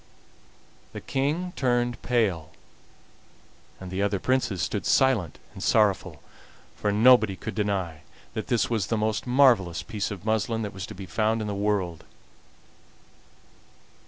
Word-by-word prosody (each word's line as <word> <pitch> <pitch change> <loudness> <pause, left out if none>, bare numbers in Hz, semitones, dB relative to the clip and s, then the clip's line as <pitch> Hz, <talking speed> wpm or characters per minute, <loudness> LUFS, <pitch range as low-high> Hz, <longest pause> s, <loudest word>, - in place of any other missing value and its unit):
The - - -5
King 155 +7 -2
turned 120 -2 0
pale, 105 -10 0 1.3
and 95 -1 -8
the 95 +1 -2
other 100 0 +1
Princes 105 -5 0
stood - - -2
silent 120 - +2 0.2
and - - -10
sorrowful, 105 -4 +1 0.5
for 105 - -1
nobody 110 -1 +5
could 110 +5 -6
deny 95 -7 -2 0.3
that 110 - -4
this 120 -5 +1
was 110 -5 -1
the 115 - 0
most 110 +3 -1
marvelous 120 - +3
piece 105 -3 -3
of 100 -1 -8
muslin 110 +1 0
that 105 - -5
was 95 -1 -6
to - - -9
be 95 0 -8
found 110 +5 0
in 110 - -3
the 105 - -2
world. 100 -5 -1
105 Hz, 140 wpm, -26 LUFS, 95-120 Hz, 1.3 s, nobody